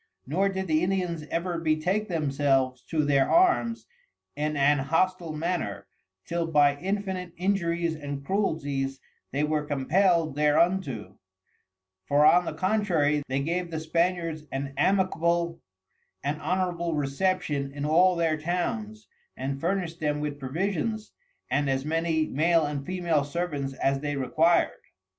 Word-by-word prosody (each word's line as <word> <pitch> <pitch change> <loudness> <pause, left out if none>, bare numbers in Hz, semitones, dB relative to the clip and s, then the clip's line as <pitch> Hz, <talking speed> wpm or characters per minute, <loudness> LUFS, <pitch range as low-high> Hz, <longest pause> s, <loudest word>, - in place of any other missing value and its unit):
Nor 185 +9 +1
did 190 0 -3
the 155 -2 +2
Indians 180 -4 -1
ever 170 0 -2
betake 165 +6 0
themselves 135 -6 +1
to 155 -3 0
their 140 -2 +3
Arms 335 -10 +3 0.5
in 150 0 -1
an 145 +1 +4
Hostile 165 +4 0
manner, 155 - -3 0.4
till 170 -1 -2
by 145 -3 +4
infinite 190 0 -3
Injuries 170 -3 0
and 145 -2 -6
Cruelties 140 -8 -1 0.3
they 140 +3 0
were 150 0 0
compell'd 160 +3 +2
thereunto: 150 - +1 0.9
For 145 +1 +4
on 175 +3 +6
the - - -3
contrary, 180 -8 +1
they 135 +1 -1
gave 170 +4 -2
the 160 -1 -3
Spaniards 165 -1 -1
an 135 0 -4
amicable 170 0 +1 0.6
and 145 +2 -2
honourable 175 -2 -1
Reception 145 -1 -1
in 145 +1 -4
all 175 +4 +4
their 165 -2 +1
Towns, 210 +6 -3 0.3
and 135 +1 -3
furnished 175 -1 -1
them 150 -1 0
with 150 -1 -4
Provisions, 195 - -2 0.4
and 145 -1 +1
as 135 0 0
many 160 0 +1
Male 165 +3 +2
and 145 -1 -3
Female 170 -3 0
Servants 145 -3 -3
as 135 +1 0
they 145 0 -3
required. 160 +6 +2
160 Hz, 135 wpm, -27 LUFS, 145-180 Hz, 0.9 s, on